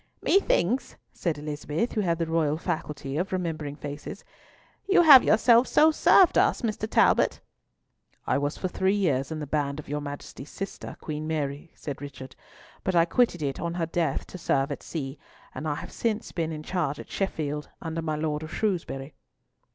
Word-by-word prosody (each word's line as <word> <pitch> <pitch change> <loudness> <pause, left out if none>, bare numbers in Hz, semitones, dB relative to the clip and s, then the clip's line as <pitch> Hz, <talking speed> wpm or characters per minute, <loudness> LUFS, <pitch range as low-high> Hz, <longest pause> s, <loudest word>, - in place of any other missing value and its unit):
"Methinks," 260 - +2 0.2
said 165 -4 -2
Elizabeth, 150 +7 -3
who 215 - 0
had 170 -4 +1
the 165 - 0
royal 160 -2 +1
faculty 150 -5 -4
of 180 +3 -1
remembering 160 -6 -3
faces, 145 0 -7 0.7
"you 385 -3 +6
have 285 -6 +10
yourself 235 +2 +5
so 315 +1 +5
served 360 +3 +5
us, - - +2
Mr. 215 -1 -2
Talbot?" - - +3 0.9
"I - - +1
was 145 +1 -2
for 185 - -2
three 190 +2 +1
years 140 -9 0
in 160 - -3
the 150 - -4
band 145 0 -1
of 155 - -9
your 150 +1 -3
Majesty's 145 -1 -8
sister, 195 0 -7
Queen 155 0 -4
Mary," 145 -1 -3
said 145 -2 -6
Richard, 135 -2 -9 0.5
"but 190 - 0
I 165 -1 +5
quitted 175 -3 +1
it 140 -1 -2
on 170 0 -3
her 170 -2 0
death 165 -3 -1
to 185 - -10
serve 140 -3 +1
at 145 - -5
sea, 140 -3 -5 0.3
and 155 - -5
I 145 - 0
have - - -8
since 220 -2 -2
been 165 -2 -2
in 155 -1 -6
charge 155 -5 -2
at - - -10
Sheffield, 150 -6 -2
under 165 0 -4
my 155 -1 -2
Lord 150 -1 -2
of 155 0 -7
Shrewsbury." 165 -10 -2
160 Hz, 180 wpm, -27 LUFS, 145-185 Hz, 0.9 s, have